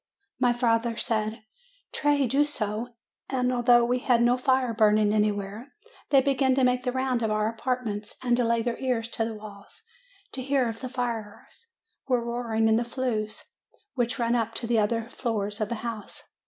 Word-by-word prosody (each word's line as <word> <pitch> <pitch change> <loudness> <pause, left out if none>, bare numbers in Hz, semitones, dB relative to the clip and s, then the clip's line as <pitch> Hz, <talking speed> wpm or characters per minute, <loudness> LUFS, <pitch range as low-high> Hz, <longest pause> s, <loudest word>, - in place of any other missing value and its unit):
My 250 -1 +4
father 230 -1 +1
said, 220 0 -1 0.5
'Tray 290 -1 +2
do 270 +4 +3
so." 235 -4 -3 0.3
And 255 -1 0
although 240 -1 +5
we 250 +1 +1
had 245 -2 +3
no 240 +1 +4
fire 255 -1 +1
burning 215 -1 +3
anywhere, 210 +4 -1 0.3
they 275 -2 +6
began 265 -1 +2
to 265 - +2
make 250 0 +3
the 250 0 -1
round 260 -1 0
of 220 - 0
our 215 0 +1
apartments, 225 -3 -3
and 245 -1 +3
to 250 - +2
lay 230 0 +1
their 235 -1 -2
ears 240 -3 -1
to 225 - -1
the 225 -1 -4
walls, 205 - -12 0.5
to 260 - -5
hear 265 -1 +1
if 225 0 -5
the 255 - -5
fire 235 -4 -4 0.6
were 245 -3 +1
roaring 235 -2 0
in 220 0 +4
the 235 - +1
flues 235 -3 -3 0.5
which 245 0 -1
run 235 -1 +1
up 230 -2 0
to 240 - -3
the 230 -1 +2
other 225 +2 0
floors 220 -4 -3
of 210 - -1
the 235 - -2
house. 225 -3 -7
235 Hz, 185 wpm, -27 LUFS, 220-250 Hz, 0.6 s, they